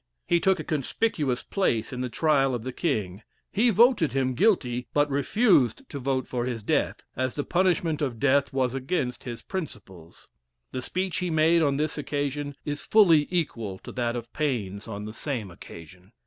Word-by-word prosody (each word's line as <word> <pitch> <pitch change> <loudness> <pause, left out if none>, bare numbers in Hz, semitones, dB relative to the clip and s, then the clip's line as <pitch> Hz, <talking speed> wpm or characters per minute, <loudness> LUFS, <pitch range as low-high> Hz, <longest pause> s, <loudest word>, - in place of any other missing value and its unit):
He 170 - +3
took 190 +1 +2
a - - -3
conspicuous 150 - -1
place 130 - 0
in 125 - -4
the 125 - -2
trial 135 -2 +2
of 115 - -5
the 130 0 -5
king; 105 - -2 0.3
he 235 +4 +3
voted 225 - +4
him 130 -1 +1
guilty, 125 - +1
but 145 0 +4
refused 170 - +2
to 140 - -5
vote 130 0 -1
for 120 -1 -2
his 120 -4 -4
death, - - 0
as 130 0 -2
the 145 - -1
punishment 175 -3 +1
of 130 -6 -2
death 140 +1 +3
was 130 -2 0
against 135 -2 -2
his 120 -2 -6
principles. 100 - -8 0.4
The 130 - -4
speech 185 +6 -2
he 180 -1 -1
made 160 +1 +4
on 140 -3 +2
this 155 +1 -1
occasion 145 0 -3
is 145 0 -3
fully 170 -9 +5
equal 115 - -2
to - - -10
that 120 -1 -1
of 120 -1 -7
Paine's 110 -9 -2
on 105 -1 -6
the 110 - -7
same 115 - -4
occasion. 90 +4 -13
140 Hz, 180 wpm, -26 LUFS, 120-165 Hz, 0.4 s, fully